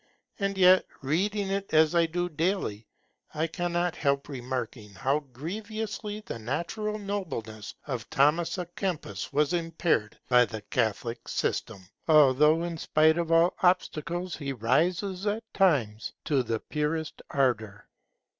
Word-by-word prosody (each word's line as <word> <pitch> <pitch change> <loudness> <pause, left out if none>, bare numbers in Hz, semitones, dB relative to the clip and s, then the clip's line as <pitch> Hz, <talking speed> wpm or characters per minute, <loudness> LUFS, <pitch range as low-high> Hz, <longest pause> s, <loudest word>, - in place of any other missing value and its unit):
And 195 -1 -1
yet, 185 0 +6 0.2
reading 195 +7 0
it 195 -4 -2
as 155 +1 +5
I 170 -1 +4
do 175 +2 -1
daily, 160 - -2 0.5
I 155 +2 +1
cannot 175 +1 -1
help 140 -1 0
remarking 120 -5 -5
how 135 +9 +1
grievously 210 - -5
the 115 - -7
natural 170 - -3
nobleness 160 - -5
of 125 -7 -5
Thomas 155 +6 +2
A'Kempis 175 - -4
was 150 +3 +2
impaired 165 -9 0
by 125 -1 +6
the 110 -1 -7
Catholic 115 +1 -2
system, 95 -2 -2 0.2
although 150 +1 +5
in 170 -2 -4
spite 160 +2 +3
of 165 -1 -1
all 165 +2 +5
obstacles 180 -1 0
he 140 -3 -4
rises 175 - 0
at 215 +3 -1
times 125 - +1
to 140 -3 +2
the 115 -2 -2
purest 150 +3 -3
ardour. 115 -7 0
160 Hz, 130 wpm, -28 LUFS, 130-180 Hz, 0.5 s, yet